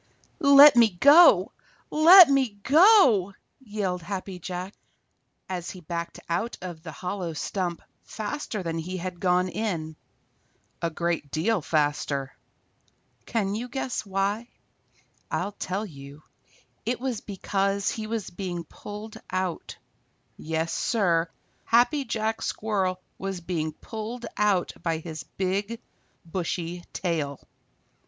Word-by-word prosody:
_ - - -39 0.4
"Let 280 -2 +9
me 235 -2 +6
go! 285 - +6 0.4
Let 340 +3 +9
me 265 -7 +1
go!" 275 - +5 0.2
yelled 205 -7 -3
Happy 185 +1 -6
Jack, 180 +2 -6 0.7
as 180 -1 -4
he 185 - -9
backed 170 0 -5
out 180 +8 -2
of 175 -3 -8
the 160 -1 -8
hollow 180 +2 -4
stump 175 +2 -3 0.2
faster 220 -2 -5
than 165 -1 -3
he 180 +3 -5
had 180 0 -6
gone 180 0 +2
in, 170 -6 -3 0.9
a 170 - 0
great 170 -2 -2
deal 180 +8 0
faster. 145 -3 -1 0.9
Can 205 -4 -1
you 235 +4 -4
guess 260 0 -3
why? 200 +3 -2 0.8
I'll 205 - -2
tell 200 +1 -4
you. 140 -3 -12 0.6
It 240 +2 -2
was 250 -4 -3
because 200 0 -1
he 220 -1 -5
was 220 -4 -4
being 175 -2 -5
pulled 210 +6 -9
out. 185 -2 -3 0.6
Yes, 160 +1 -3
Sir, 175 -7 +1 0.3
Happy 255 +5 +3
Jack 220 -1 -2
Squirrel 190 -4 -1 0.2
was 195 -1 -4
being 165 -3 -3
pulled 225 +8 -7
out 205 -3 +1
by 165 -1 -1
his 160 -1 -7 0.2
big, 200 +4 -1 0.5
bushy 175 0 -4
tail. 155 -6 -2
190 Hz, 120 wpm, -26 LUFS, 170-220 Hz, 0.9 s, Let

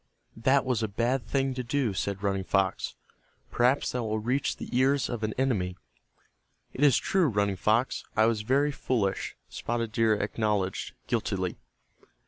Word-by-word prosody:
"That 130 +5 +3
was 125 -3 0
a 110 - 0
bad 120 +5 -1
thing 135 -1 0
to 125 0 -4
do," 125 -3 0
said 100 +1 -3
Running 100 -1 0
Fox. 95 +1 0 0.6
"Perhaps 125 +3 +2
that 125 - -2
will 110 -1 -1
reach 125 +6 -1
the - - -6
ears 135 +2 +3
of 120 -3 -3
an 110 0 -2
enemy." 100 -9 0 1.0
"It 140 - -1
is 140 -5 +6
true, 190 -4 +2
Running 100 -4 +1
Fox, 110 +7 +1
I 110 - +6
was 115 -2 +1
very 140 +6 +2
foolish," 110 -8 -1
Spotted 115 -1 -3
Deer 110 -1 +3
acknowledged, 105 -2 -1
guiltily. - - -1
115 Hz, 155 wpm, -28 LUFS, 105-130 Hz, 1.0 s, is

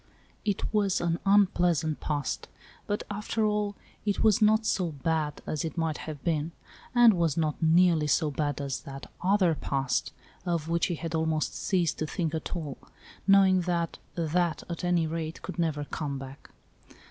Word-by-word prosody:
It 205 0 -2
was 200 -3 +2
an 170 0 0
unpleas 180 -5 +4
ant 155 -1 -2
past, 145 -2 -2 0.4
but, 205 - -1
after 210 +2 -1
all, 210 -1 0 0.3
it 205 -2 0
was 215 -2 +4
not 215 +1 +4
so 185 -5 +1
bad 150 +1 -2
as 155 - -2
it 165 +1 -5
might 160 -2 -1
have 145 -3 -7
been, 160 0 -1 0.4
and 240 -2 +8
Was 170 -4 +1
not 155 -1 0
nearly 165 -1 +4
so 150 +1 +2
bad 145 0 -1
as 140 -2 -3
that 135 0 -9
"other 185 -2 +3
past" 135 -3 -1 0.3
of 170 -3 -1
which 170 0 +1
he 175 - -2
had 165 +1 -5
almost 160 -1 0
ceased 180 -5 0
to 155 - -1
think 165 0 -2
at 160 +3 -3
all, 150 -6 -5 0.5
knowing 195 -2 +6
that 170 -1 -1
" - - -35
that," 170 0 0
at 170 +1 -5
any 175 -2 +2
rate, 160 0 -4
could 185 - -6
never 155 -3 0
come 145 -2 -4
back. 135 +1 -10
165 Hz, 175 wpm, -28 LUFS, 155-185 Hz, 0.5 s, and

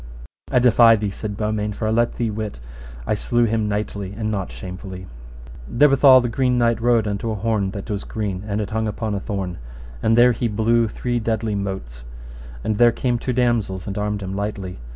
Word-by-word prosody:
I - - +3
defy 120 -2 +6
thee, 105 -2 -2
said 105 0 -6
Beaumains, 105 -1 -2
for 110 - -2
I - - +1
let 120 +1 +1
thee 115 -2 -1
wit 105 - -5 0.5
I - - 0
slew 120 +3 +1
him 110 -1 0
knightly 100 -1 -3
and 110 -1 -2
not 100 -3 -3
shamefully. 95 0 -8 0.6
Therewithal 135 - +6
the 120 - -1
Green 125 +1 +1
Knight 115 -1 +2
rode 115 -2 +3
unto 105 +2 -2
an 110 - -3
horn 105 -2 0
that 100 -2 -6
was 100 -1 -3
green, 100 -3 -4
and 105 0 -1
it 105 -1 -4
hung 110 0 -1
upon 105 0 -3
a 100 - -1
thorn, 95 -4 -4 0.4
and 115 +1 +2
there 125 +1 +7
he 120 0 -1
blew 115 +2 +2
three 120 +3 -2
deadly 110 -1 -1
motes, 95 -13 -5 0.6
and 105 -1 -1
there 120 -1 +7
came 120 0 -1
two 125 - -2
damosels 115 -7 0
and 100 - -5
armed 105 -1 -2
him 95 0 -5
lightly. 100 - -4
110 Hz, 200 wpm, -21 LUFS, 100-115 Hz, 0.6 s, there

